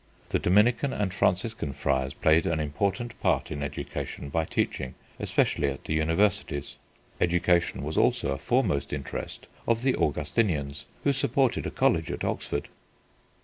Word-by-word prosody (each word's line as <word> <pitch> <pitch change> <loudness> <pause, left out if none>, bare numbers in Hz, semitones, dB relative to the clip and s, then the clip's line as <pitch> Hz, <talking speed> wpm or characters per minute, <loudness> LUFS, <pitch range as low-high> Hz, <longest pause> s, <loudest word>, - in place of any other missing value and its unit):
The - - +1
Dominican 115 +8 +3
and 100 -3 -1
Franciscan 95 -5 0
Friars 65 0 0
played 80 +1 +3
an 80 -2 +1
important 100 - -2
part - - +1
in 75 -2 -4
education 70 0 -5
by 80 +2 0
teaching, 65 -4 -2 0.2
especially - - +1
at 70 -1 -4
the - - -2
Universities. 80 -2 +1 0.4
Education 85 -5 +2
was 75 +2 -3
also - - +2
a 70 - -2
foremost 70 +1 +1
interest 70 -2 -5 0.2
of 115 0 +2
the 130 -1 +3
Augustinians, 75 -2 0 0.2
who 140 - +3
supported 135 -1 +1
a - - -1
college 80 -1 +2
at - - -4
Oxford. - - -2
80 Hz, 145 wpm, -27 LUFS, 70-105 Hz, 0.4 s, Dominican